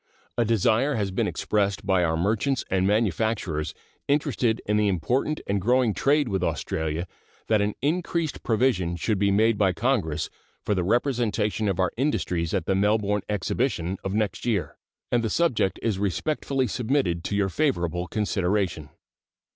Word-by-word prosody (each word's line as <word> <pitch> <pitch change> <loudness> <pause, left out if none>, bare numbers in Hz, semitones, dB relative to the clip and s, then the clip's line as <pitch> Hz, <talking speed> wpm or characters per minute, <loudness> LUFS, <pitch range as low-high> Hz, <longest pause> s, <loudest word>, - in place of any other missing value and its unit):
A 120 - +2
desire 115 +5 +2
has 100 -4 -1
been 95 - 0
expressed 100 -2 -1
by 95 -2 +3
our 80 -1 +1
merchants 110 - 0
and 95 0 +2
manufacturers 105 -6 0 0.3
interested 140 -6 +1
in 105 - +1
the 105 0 +3
important 125 - 0
and 100 -1 0
growing 120 +1 +3
trade 145 +3 +2
with 95 -4 -1
Australia 80 0 -2 0.4
that 110 -2 +4
an 105 +1 -1
increased 165 0 -1
provision 110 -7 +1
should 100 +3 -1
be 100 0 +3
made 110 +2 +3
by 95 -3 +3
Congress 90 - 0 0.3
for 105 - +1
the 90 -3 0
representation 115 -1 0
of 95 -2 -1
our 95 -1 +2
industries 90 - 0
at 95 -5 -1
the 95 - +1
Melbourne 105 +1 +2
exhibition 100 -2 -1
of 95 +1 -2
next 105 -2 -1
year, 110 -6 -1 0.4
and 120 -1 +2
the 110 - 0
subject 130 - +1
is 110 -5 0
respectfully 135 - -1
submitted 110 -8 0
to 100 - -1
your 100 -1 +1
favorable 90 - 0
consideration. 95 -6 -1
105 Hz, 155 wpm, -25 LUFS, 95-120 Hz, 0.4 s, that